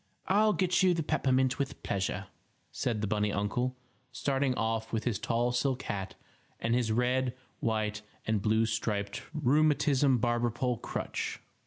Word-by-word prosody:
"I'll 210 Hz, +2 st, +4 dB
get 185 Hz, -1 st, +2 dB
you 185 Hz, -2 st, +4 dB
the 165 Hz, -, -1 dB
peppermint 130 Hz, -3 st, +1 dB
with 140 Hz, -1 st, -3 dB
pleasure," 95 Hz, 0 st, -1 dB, 0.5 s
said 115 Hz, -4 st, -1 dB
the 105 Hz, -, 0 dB
bunny 105 Hz, 0 st, +1 dB
uncle, 120 Hz, +6 st, -1 dB, 0.4 s
starting 135 Hz, +1 st, 0 dB
off 115 Hz, -1 st, -1 dB
with 110 Hz, -1 st, -1 dB
his 115 Hz, -5 st, -1 dB
tall 120 Hz, +1 st, +1 dB
silk 130 Hz, +1 st, 0 dB
hat 95 Hz, -3 st, -4 dB, 0.4 s
and 115 Hz, +1 st, 0 dB
his 120 Hz, -2 st, +1 dB
red, 125 Hz, +2 st, +1 dB, 0.2 s
white 110 Hz, -1 st, -1 dB, 0.2 s
and 110 Hz, -2 st, +1 dB
blue 110 Hz, +2 st, +3 dB
striped 105 Hz, -2 st, -2 dB
rheumatism 145 Hz, -2 st, +3 dB
barber 120 Hz, +1 st, +1 dB
pole 120 Hz, +1 st, -1 dB
crutch. -, -, -3 dB
120 Hz, 150 wpm, -30 LUFS, 110-135 Hz, 0.5 s, I'll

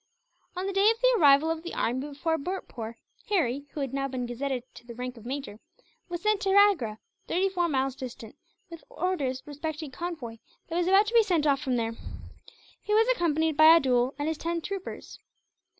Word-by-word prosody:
On 365 Hz, +1 st, -3 dB
the 395 Hz, -, -2 dB
day 395 Hz, +2 st, +5 dB
of 455 Hz, 0 st, 0 dB
the -, -, +4 dB
arrival 290 Hz, +1 st, +5 dB
of 325 Hz, -1 st, -3 dB
the 345 Hz, -, -7 dB
army 245 Hz, +3 st, 0 dB
before 320 Hz, +3 st, -2 dB
Bhurtpoor, 255 Hz, -9 st, -5 dB, 0.3 s
Harry 285 Hz, -, 0 dB
who 295 Hz, -, -4 dB
had 270 Hz, -2 st, -3 dB
now 275 Hz, 0 st, -1 dB
been 255 Hz, -2 st, -4 dB
gazetted 250 Hz, +1 st, -3 dB
to 240 Hz, -, -15 dB
the 235 Hz, -, -9 dB
rank 250 Hz, +1 st, -5 dB
of 230 Hz, 0 st, -12 dB
major 265 Hz, -5 st, -5 dB, 0.5 s
was 345 Hz, +1 st, -5 dB
sent 425 Hz, -2 st, +2 dB
to 390 Hz, 0 st, +1 dB
Agra, 335 Hz, -, +4 dB, 0.3 s
thirty 375 Hz, +3 st, +1 dB
four 350 Hz, -2 st, 0 dB
miles 265 Hz, -2 st, 0 dB
distant, 240 Hz, -4 st, -9 dB, 0.4 s
with 335 Hz, -1 st, -10 dB
orders 280 Hz, -9 st, -2 dB
respecting 300 Hz, +1 st, -5 dB
a 260 Hz, -, -16 dB
convoy 310 Hz, -10 st, -6 dB, 0.3 s
that 330 Hz, -, -4 dB
was 350 Hz, 0 st, +1 dB
about 390 Hz, +3 st, +5 dB
to 440 Hz, -, -4 dB
be 465 Hz, -, +7 dB
sent 350 Hz, -8 st, +1 dB
off 280 Hz, -2 st, +3 dB
from 260 Hz, -4 st, -1 dB
there. 230 Hz, -1 st, -1 dB, 0.9 s
He 420 Hz, -, 0 dB
was 450 Hz, +2 st, +4 dB
accompanied 320 Hz, -3 st, +1 dB
by 310 Hz, +1 st, +6 dB
Abdool 255 Hz, -4 st, +2 dB
and 295 Hz, +2 st, -1 dB
ten 335 Hz, 0 st, -2 dB
troopers. 390 Hz, +2 st, -7 dB
300 Hz, 200 wpm, -27 LUFS, 260-360 Hz, 0.9 s, be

